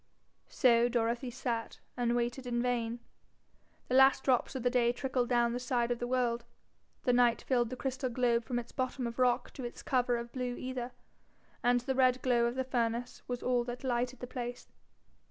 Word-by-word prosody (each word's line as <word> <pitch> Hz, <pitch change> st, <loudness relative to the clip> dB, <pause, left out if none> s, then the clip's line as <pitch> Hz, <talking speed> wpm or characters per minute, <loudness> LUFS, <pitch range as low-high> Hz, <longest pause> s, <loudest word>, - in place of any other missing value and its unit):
So 240 Hz, -1 st, +4 dB
Dorothy 235 Hz, +1 st, 0 dB
sat, 235 Hz, -2 st, -4 dB, 0.2 s
and 240 Hz, -1 st, +1 dB
waited 240 Hz, +2 st, -2 dB
in 240 Hz, -1 st, 0 dB
vain. 240 Hz, -1 st, -1 dB, 0.9 s
The -, -, -3 dB
last 265 Hz, +1 st, +6 dB
drops 255 Hz, 0 st, +1 dB
of 260 Hz, -, -3 dB
the 245 Hz, -, +3 dB
day 240 Hz, -2 st, +3 dB
trickled 250 Hz, -1 st, -1 dB
down 240 Hz, -1 st, +2 dB
the 245 Hz, -, -2 dB
side 245 Hz, -1 st, 0 dB
of 240 Hz, -, -1 dB
the 245 Hz, -, -2 dB
world, 240 Hz, -2 st, 0 dB, 0.6 s
the 250 Hz, -, +3 dB
night 245 Hz, -1 st, +3 dB
filled 240 Hz, -3 st, +1 dB
the 255 Hz, -, -4 dB
crystal 260 Hz, 0 st, -2 dB
globe 235 Hz, -1 st, +1 dB
from 245 Hz, +1 st, -3 dB
its 240 Hz, -1 st, -5 dB
bottom 255 Hz, 0 st, -2 dB
of 235 Hz, +1 st, -5 dB
rock 250 Hz, -1 st, +2 dB
to 265 Hz, -, -7 dB
its 240 Hz, -, -7 dB
cover 245 Hz, -2 st, +1 dB
of 235 Hz, 0 st, -6 dB
blue 250 Hz, -1 st, -3 dB
aether, 255 Hz, -1 st, -4 dB, 0.7 s
and 245 Hz, 0 st, +3 dB
the 265 Hz, +2 st, -1 dB
red 255 Hz, -1 st, +3 dB
glow 240 Hz, -2 st, +3 dB
of 235 Hz, -, -3 dB
the 260 Hz, -, 0 dB
furnace 245 Hz, -1 st, -2 dB
was 245 Hz, -1 st, -4 dB
all 245 Hz, -1 st, +2 dB
that 245 Hz, +1 st, -6 dB
lighted 250 Hz, 0 st, -1 dB
the -, -, -3 dB
place. 245 Hz, -1 st, -6 dB
245 Hz, 195 wpm, -32 LUFS, 240-255 Hz, 0.9 s, last